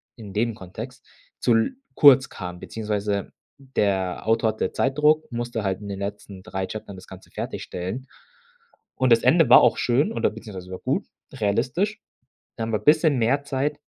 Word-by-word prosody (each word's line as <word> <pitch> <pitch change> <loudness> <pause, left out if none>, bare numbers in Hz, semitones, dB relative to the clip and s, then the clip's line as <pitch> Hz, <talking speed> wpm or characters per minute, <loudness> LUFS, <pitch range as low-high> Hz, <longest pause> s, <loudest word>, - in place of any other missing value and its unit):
in 105 -5 -10
dem 115 +2 0
Kontext 110 +9 -9 0.3
zu 120 - +3
l 115 - +1 0.2
kurz 135 -3 +7
kam, 90 -2 -7
beziehungsweise 105 -2 -3 0.3
der 100 -9 -1
Autor 115 0 +3
hatte 110 -3 -2
Zeitdruck, 150 +1 +2
musste 120 -2 -3
halt 95 -1 -1
in 100 - -8
den 100 0 -5
letzten 100 -1 -6
3 95 0 -3
Chaptern 100 -1 -8
das 95 - -13
Ganze 95 0 -13
fertigstellen. 95 +9 -5 0.9
Und 130 -2 +1
das 115 - +3
Ende 155 +5 +5
war - - +9
auch - - +4
schön 135 - +1
oder - - +1
beziehungsweise 100 -5 -9
war 95 - -6
gut, - - -1 0.3
realistisch. 135 - -1 0.6
Da 115 - -3
haben 110 0 -3
wir 105 - +1
bisschen 150 - +4
mehr 135 +5 +1
Zeit 145 +2 -2
115 Hz, 170 wpm, -24 LUFS, 100-135 Hz, 0.9 s, war